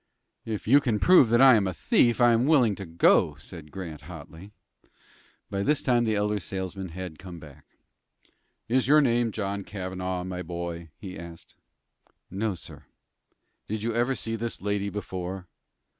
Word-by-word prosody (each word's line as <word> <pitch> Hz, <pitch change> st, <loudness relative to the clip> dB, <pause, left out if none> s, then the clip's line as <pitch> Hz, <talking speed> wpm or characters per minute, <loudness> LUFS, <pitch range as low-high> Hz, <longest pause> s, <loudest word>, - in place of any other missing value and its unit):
"If 110 Hz, -2 st, -5 dB
you 140 Hz, +5 st, +6 dB
can 115 Hz, -6 st, 0 dB
prove 175 Hz, -, +6 dB
that 120 Hz, +2 st, +4 dB
I 135 Hz, -1 st, +9 dB
am 105 Hz, -4 st, +3 dB
a 95 Hz, -, -3 dB
thief, 120 Hz, -, +2 dB
I 120 Hz, -1 st, +6 dB
am 115 Hz, +4 st, +2 dB
willing 130 Hz, -9 st, +4 dB
to 100 Hz, -1 st, -8 dB
go," 85 Hz, +1 st, +3 dB
said 75 Hz, -2 st, -11 dB
Grant, 85 Hz, -5 st, -7 dB
hotly. 80 Hz, +3 st, -11 dB, 1.0 s
By 100 Hz, -, -1 dB
this 150 Hz, +8 st, +1 dB
time 120 Hz, -2 st, +2 dB
the 110 Hz, -1 st, +1 dB
elder 105 Hz, 0 st, 0 dB
salesman 95 Hz, -1 st, -5 dB
had 85 Hz, -2 st, -7 dB
come 90 Hz, -2 st, -9 dB
back. 75 Hz, -4 st, -14 dB, 1.0 s
"Is 125 Hz, 0 st, +1 dB
your 150 Hz, +2 st, +6 dB
name 120 Hz, -3 st, +2 dB
John 100 Hz, -1 st, -3 dB
Cavanaugh, 95 Hz, -2 st, -4 dB
my 90 Hz, 0 st, -5 dB
boy?" 85 Hz, -1 st, -6 dB
he 95 Hz, -4 st, -8 dB
asked. 85 Hz, -1 st, -11 dB, 0.8 s
"No, 100 Hz, +1 st, -2 dB
sir." 85 Hz, -, -11 dB, 0.8 s
"Did 110 Hz, 0 st, -4 dB
you 115 Hz, 0 st, -1 dB
ever 120 Hz, +3 st, +1 dB
see 115 Hz, -2 st, -3 dB
this 115 Hz, +1 st, -4 dB
lady 100 Hz, 0 st, -1 dB
before?" 95 Hz, -2 st, -5 dB
100 Hz, 165 wpm, -27 LUFS, 90-115 Hz, 1.0 s, I